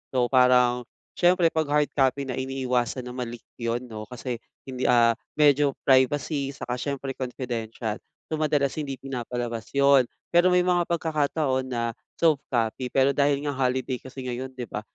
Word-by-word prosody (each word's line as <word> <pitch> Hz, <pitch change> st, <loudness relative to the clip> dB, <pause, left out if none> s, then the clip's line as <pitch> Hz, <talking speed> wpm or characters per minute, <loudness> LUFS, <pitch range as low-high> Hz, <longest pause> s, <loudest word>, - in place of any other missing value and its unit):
So, 125 Hz, 0 st, +2 dB
parang 125 Hz, -1 st, +4 dB, 0.2 s
siyempre, 175 Hz, -1 st, +3 dB
'pag 160 Hz, -2 st, 0 dB
hard 150 Hz, 0 st, +2 dB
copy 135 Hz, 0 st, +1 dB
na, 130 Hz, -2 st, -4 dB
iniiwasan 130 Hz, -2 st, -1 dB
na 125 Hz, -, -7 dB
ma-leak 120 Hz, -2 st, -6 dB, 0.2 s
'yon, 115 Hz, +1 st, -1 dB
'no? 110 Hz, -3 st, -8 dB
Kasi 125 Hz, -1 st, -5 dB, 0.2 s
hindi, 130 Hz, -1 st, -3 dB
ah, 120 Hz, -1 st, +5 dB, 0.2 s
medyo 145 Hz, -2 st, +4 dB
privacy 140 Hz, +1 st, +2 dB
saka 125 Hz, -2 st, -4 dB
siyempre, 140 Hz, 0 st, -3 dB
confidential. 120 Hz, -4 st, -4 dB, 0.3 s
So, 155 Hz, -, -1 dB
madalas 145 Hz, -3 st, +1 dB
hindi 135 Hz, -2 st, -5 dB
pinapalabas 120 Hz, -3 st, -5 dB
'yon. 140 Hz, -3 st, +5 dB, 0.2 s
Pero 175 Hz, +1 st, +5 dB
may 180 Hz, 0 st, +3 dB
mga 175 Hz, -1 st, +1 dB
pagkakataon 150 Hz, -5 st, 0 dB
na 115 Hz, -2 st, -2 dB, 0.2 s
soft 155 Hz, -4 st, +3 dB
copy, 120 Hz, +1 st, -1 dB
pero 135 Hz, +1 st, +3 dB
dahil 140 Hz, 0 st, +1 dB
nga 145 Hz, -, -1 dB
holiday 130 Hz, -1 st, -1 dB
kasi 130 Hz, 0 st, -9 dB
ngayon, 125 Hz, +1 st, -4 dB
'di 125 Hz, -, -4 dB
ba? 105 Hz, -, -5 dB
130 Hz, 160 wpm, -26 LUFS, 125-140 Hz, 0.3 s, ah